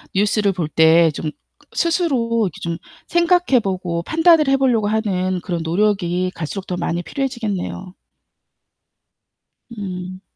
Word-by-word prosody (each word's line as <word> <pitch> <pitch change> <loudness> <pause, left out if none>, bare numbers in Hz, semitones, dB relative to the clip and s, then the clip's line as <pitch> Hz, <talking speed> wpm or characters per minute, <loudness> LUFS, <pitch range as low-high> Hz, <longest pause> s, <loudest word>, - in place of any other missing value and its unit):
뉴스를 205 0 +2
볼 175 -4 -2
때 160 +1 +5
좀 155 - -3 0.5
스스로 250 - +1
이렇게 - - -13
좀 170 -1 -3 0.3
생각해 345 -5 +3
보고 180 -3 -2
판단을 320 - +4
해 270 0 +4
보려고 240 -6 +2
하는 190 -4 0
그런 175 -1 -3
노력이 185 0 0
갈수록 180 +4 -5
더 180 - -3
많이 175 0 -2
필요해지겠네요. 215 - -4 1.8
음. 185 -2 -6
195 Hz, 265 characters per minute, -20 LUFS, 175-240 Hz, 1.8 s, 때